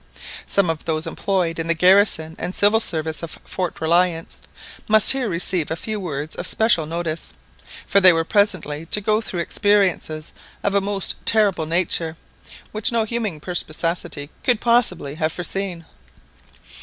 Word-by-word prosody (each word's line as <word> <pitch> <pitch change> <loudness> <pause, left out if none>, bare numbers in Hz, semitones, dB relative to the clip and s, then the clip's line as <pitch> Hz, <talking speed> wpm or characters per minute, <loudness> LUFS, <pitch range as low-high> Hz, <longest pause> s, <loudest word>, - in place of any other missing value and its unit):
Some 200 -2 +2
of 160 - -8
those 160 0 -2
employed 170 -1 -1
in 165 - -3
the 170 - +1
garrison 180 -3 +4
and 180 - -4
civil 205 +2 +4
service 160 -6 -1
of 165 - -7
Fort 180 -3 -4
Reliance 165 0 0 0.5
must 215 0 +5
here 265 -4 -1
receive 170 -1 -1
a 160 - -2
few 215 +5 -4
words 155 -4 -5
of - - -4
special 215 -9 +2
notice, 165 0 -4 0.5
for 200 - +3
they 185 -1 +9
were 165 -1 +1
presently 165 -6 0
to 210 - +2
go 215 +2 +1
through 180 -6 -4
experiences 185 -6 0 0.3
of 200 - 0
a 200 - +2
most 200 0 +1
terrible 200 -7 +3
nature, 165 -1 0 0.5
which 215 +3 +1
no 230 -1 +1
human 220 -7 -3
perspicacity 165 -2 -3
could 245 -4 +2
possibly 220 - +1
have 155 0 +1
foreseen. 175 0 -3
180 Hz, 155 wpm, -21 LUFS, 160-205 Hz, 0.5 s, they